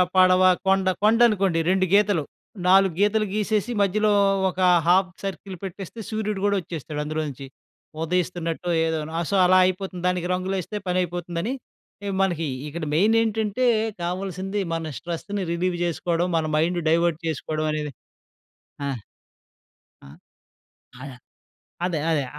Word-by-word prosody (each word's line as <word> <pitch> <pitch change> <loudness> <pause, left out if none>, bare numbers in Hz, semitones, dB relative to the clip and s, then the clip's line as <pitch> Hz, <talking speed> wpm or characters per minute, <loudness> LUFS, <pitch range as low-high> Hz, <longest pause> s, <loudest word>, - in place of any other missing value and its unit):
పడవ, 185 0 +6 0.2
కొండ 190 0 +2 0.2
కొండనుకోండి 210 -6 +4
2 185 0 +3
గీతలు, 205 -6 +4 0.4
4 190 -1 +5
గీతలు 215 +1 +3
గీసేసి, 215 +2 0
మధ్యలో 210 +2 +2 0.4
ఒకా 185 +1 +1 0.2
½ 185 +1 +4
సర్కిల్ 195 0 -5
పెట్టేస్తే 195 +3 -7
సూర్యుడు 215 -2 -2
గోడొచ్చేస్తాడు 165 -7 -2
అందులోంచి. 150 -3 -4 0.6
ఉదయిస్తున్నట్టో 175 0 -2
ఏదో. 160 -1 -1
నా 165 - -2
సో, 200 - 0
అలా 185 +1 +5
అయిపోతుంది. 185 -1 -3
దానికి 180 -1 0
రంగులేస్తే 185 +2 -3
పనయిపోతుందని 175 +4 -2 0.5
ఆహ్, 195 - -2
మనకీ 170 -4 0 0.2
ఇక్కడ 160 +3 -6
మెయినేంటంటే 220 +4 +2 0.4
కావల్సింది, 190 +2 -3
మన 165 -1 -3
స్ట్రెస్‌ని 185 +4 -4
రిలీవ్ 175 +1 0
చేసుకోడం, 170 0 0
మన 160 - 0
మైండ్ 175 +3 +1
డైవర్ట్ 170 -1 +2
చేసుకోడవనేదే. 155 -1 -2 0.9
ఆ! 135 -2 -2 1.1
ఆ! - - -12 0.9
ఆయ 140 0 -7 0.7
అదే 170 -4 -1
అదే. 150 -4 +1
180 Hz, 115 wpm, -24 LUFS, 165-195 Hz, 1.1 s, పడవ